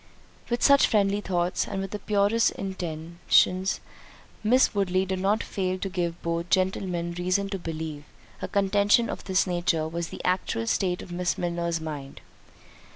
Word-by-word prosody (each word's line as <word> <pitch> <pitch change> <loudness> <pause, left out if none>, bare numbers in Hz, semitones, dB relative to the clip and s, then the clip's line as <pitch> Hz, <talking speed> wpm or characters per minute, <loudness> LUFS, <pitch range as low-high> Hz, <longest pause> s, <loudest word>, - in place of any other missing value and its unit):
With 240 0 -1
such 280 -1 +6
friendly 205 -2 +2
thoughts, 180 -2 -1
and 195 - -3
with 195 0 -4
the 210 - -4
purest 210 +3 +2
intentions, 180 +1 0 0.6
Miss 250 +5 +4
Woodley 190 -2 +1
did 190 0 -2
not 200 +4 +1
fail 185 -1 -2
to 195 - -4
give 175 -2 -2
both 170 +1 -2
gentlemen 185 -2 0
reason 185 +3 0
to 195 -1 -3
believe, 160 -3 -5 0.4
a - - -2
contention 205 +3 +3
of - - -7
this 190 -1 +2
nature 175 -3 0
was 170 +1 -3
the - - -9
actual 180 -11 0
state 180 +8 0
of - - -11
Miss 175 0 -1
Milner's 170 -1 -1
mind. 150 -4 -7
185 Hz, 155 wpm, -26 LUFS, 170-195 Hz, 0.6 s, such